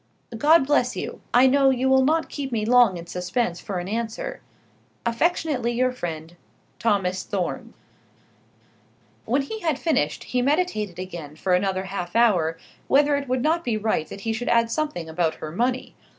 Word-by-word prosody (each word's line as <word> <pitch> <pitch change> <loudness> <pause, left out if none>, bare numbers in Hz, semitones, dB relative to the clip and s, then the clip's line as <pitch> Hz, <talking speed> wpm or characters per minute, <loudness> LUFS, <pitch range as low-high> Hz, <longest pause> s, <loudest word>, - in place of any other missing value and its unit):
God 300 +5 +5
bless 265 -4 +2
you. - - -5
I 245 +2 +6
know 270 +1 +5
you 260 0 +1
will 265 0 +5
not 320 +4 +2
keep 275 -2 -5
me 220 -3 -1
long 240 -5 +5
in 170 - -8
suspense 180 +2 -2
for 195 - -5
an 175 0 -4
answer. 225 +2 -4 0.6
Affectionately 250 -1 0
your 255 +2 +1
friend, 165 -7 -6 0.4
THOMAS 190 -4 +1
THORNE. 190 -4 -4 1.5
When 265 +5 +1
he 440 +11 -6
had 320 -8 0
finished 220 - 0
he 250 - -1
meditated 250 - 0
again 170 -5 -7
for 180 +3 -1
another 190 +1 +1
half 190 -1 -5
hour 180 -9 +3 0.3
whether 290 +1 +4
it 280 -1 -3
would 255 0 0
not 330 +2 +1
be 235 -7 0
right 215 -7 -1
that 200 - -9
he 225 +2 -1
should 245 +2 -3
add 230 -1 +3
something 295 - -2
about 160 0 0
her 155 - -7
money. 245 +8 -1
230 Hz, 170 wpm, -24 LUFS, 180-265 Hz, 1.5 s, I